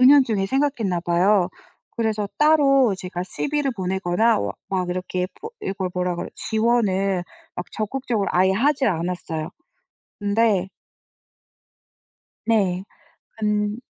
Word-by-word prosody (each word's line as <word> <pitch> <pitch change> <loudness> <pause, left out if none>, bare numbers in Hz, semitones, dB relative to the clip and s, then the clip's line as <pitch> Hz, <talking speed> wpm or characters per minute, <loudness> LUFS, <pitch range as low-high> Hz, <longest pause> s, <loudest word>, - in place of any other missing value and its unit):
은연중에 255 -7 +5
생각했나 260 -8 0
봐요. 180 +2 +3 0.5
그래서 220 -2 0
따로 275 -7 +5
제가 180 -1 -5
CV를 285 +9 -1
보내거나 190 +4 +1
워 - - -2 0.2
막 185 -2 -1
이렇게 180 0 -2
보 445 - -6
이걸 190 -1 -3
뭐라 180 0 -1
그래 - - -4
지원을 195 -5 +1 0.3
막 180 - -4
적극적으로 225 -2 -1
아예 185 +1 +3
하지 270 +6 +2
않았어요. 170 -3 -2 0.7
근데 205 -2 +2 1.8
네. 195 -5 +2 0.5
근 210 0 0
200 Hz, 245 characters per minute, -23 LUFS, 180-235 Hz, 1.8 s, 은연중에